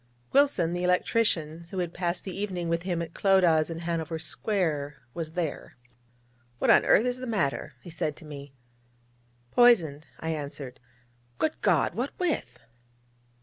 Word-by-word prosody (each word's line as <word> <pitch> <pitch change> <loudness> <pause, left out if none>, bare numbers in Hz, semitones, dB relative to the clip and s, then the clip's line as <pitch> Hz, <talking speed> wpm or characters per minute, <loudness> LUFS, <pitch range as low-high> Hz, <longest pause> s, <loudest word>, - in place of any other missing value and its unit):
Wilson, 270 - +3
the 175 0 -2
electrician, 170 -3 +1
who 190 - -7
had 175 -2 -2
passed 175 -1 -2
the 190 - -6
evening 185 -4 -3
with 170 0 0
him 175 -2 -2
at 165 - -9
Clodagh's 175 -5 +4
in 165 0 -5
Hanover 165 -1 -2
Square, 160 -5 -1 0.2
was 160 -1 -5
there. 170 -7 -4 0.8
'What - - +3
on - - +6
earth 225 - +5
is 250 0 -1
the 255 - -5
matter?' 180 - -1
he 175 - -10
said 155 -2 -2
to 160 - -13
me. 140 -2 -9 1.0
'Poisoned,' 170 -12 +4
I 160 - -4
answered. 140 -4 -6 0.6
'Good 315 - -1
God! - - +3
what - - -3
with?' 355 -4 -2
170 Hz, 150 wpm, -28 LUFS, 155-195 Hz, 1.0 s, on